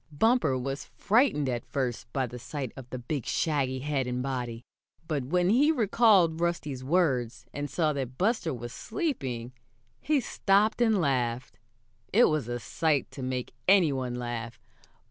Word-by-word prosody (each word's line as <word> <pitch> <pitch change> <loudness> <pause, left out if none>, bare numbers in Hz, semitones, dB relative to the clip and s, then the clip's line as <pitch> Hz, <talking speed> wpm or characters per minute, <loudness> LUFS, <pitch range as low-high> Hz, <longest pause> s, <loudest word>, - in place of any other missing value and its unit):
Bumper 160 - +2
was 135 +2 -4
frightened 215 - +2
at 120 -2 -2
first 125 -3 -3
by 135 -1 0
the 125 0 -8
sight 125 0 -5
of 130 -2 -10
the 130 - -5
big, 125 +2 -3
shaggy 135 -5 0
head 140 -2 -1
and 125 0 -2
body, 125 -3 -4 0.4
but 145 -5 -1
when 180 +6 +2
he 285 +7 +5
recalled 205 - +4
Rusty's 150 -6 -2
words, 130 -7 +1
and 145 0 -4
saw 155 -3 +1
that 130 -2 -4
Buster 200 - +1
was 120 -2 -6
sleeping, 130 - -3 0.5
he 300 -1 +1
stopped 215 -1 +2
and 220 -4 +4
laughed. 125 -6 -1 0.5
It 235 +5 +6
was 155 -6 -1
a 120 0 -3
sight 155 +1 0
to 135 - -8
make 130 -1 -3
any 185 -7 +5
one 130 -2 -3
laugh. 120 -1 -5
140 Hz, 160 wpm, -28 LUFS, 125-180 Hz, 0.5 s, It